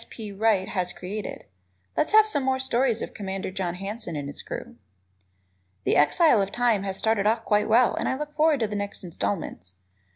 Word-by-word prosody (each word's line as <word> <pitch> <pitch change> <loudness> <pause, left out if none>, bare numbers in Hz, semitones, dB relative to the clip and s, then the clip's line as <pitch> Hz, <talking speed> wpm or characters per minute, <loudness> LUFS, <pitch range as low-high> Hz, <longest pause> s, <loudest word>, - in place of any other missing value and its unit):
P. 215 -3 -7
Wright 200 -1 +2
has 180 -2 -2
created. 200 +4 -6 0.5
Let's - - +1
have 435 0 +8
some 425 -10 +1
more 265 0 +1
stories 260 -3 +1
of - - -7
Commander 195 -2 -4
John 185 -2 -3
Hanson 195 -1 -5
and 145 -1 -4
his 145 - -7
crew. - - -7 1.1
"The - - +2
Exile 225 - +5
of 195 0 -2
Time" 240 -4 +2
has 195 -1 -3
started 220 -2 +1
off 225 +2 +1
quite 210 0 +2
well 235 +2 +5
and - - -1
I 260 - -1
look 300 +1 -6
forward 305 -3 +3
to 220 - +2
the 210 - -5
next 205 -1 -4
installments. 165 - -4
210 Hz, 195 wpm, -26 LUFS, 190-245 Hz, 1.1 s, have